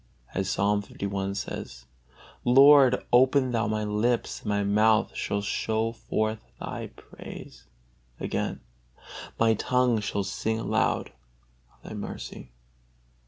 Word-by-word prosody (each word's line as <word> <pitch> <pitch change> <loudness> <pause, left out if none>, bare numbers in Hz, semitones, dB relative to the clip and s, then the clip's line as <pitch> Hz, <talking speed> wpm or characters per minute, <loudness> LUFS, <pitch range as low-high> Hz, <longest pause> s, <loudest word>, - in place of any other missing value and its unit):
As 95 0 -1
Psalm 100 +2 +1 0.2
li. 100 0 -2
says: 60 -10 -6 0.6
"Lord, 135 0 +6
open 130 +1 +4
Thou 115 -1 0
my 110 0 -1
lips, 105 +3 0
and 105 - -6
my 100 0 +1
mouth 110 +2 +3
shall 100 0 -2
show 110 +2 -1
forth 110 -1 -2 0.2
Thy - - -5
praise." - - -12 0.5
Again: - - -3 0.8
"My 115 -1 +4
tongue 125 +1 +1
shall 100 0 -2
sing 110 +3 -2
aloud - - 0 0.6
of - - -18
Thy - - -7
mercy." 60 - -7
110 Hz, 120 wpm, -27 LUFS, 100-120 Hz, 0.8 s, Lord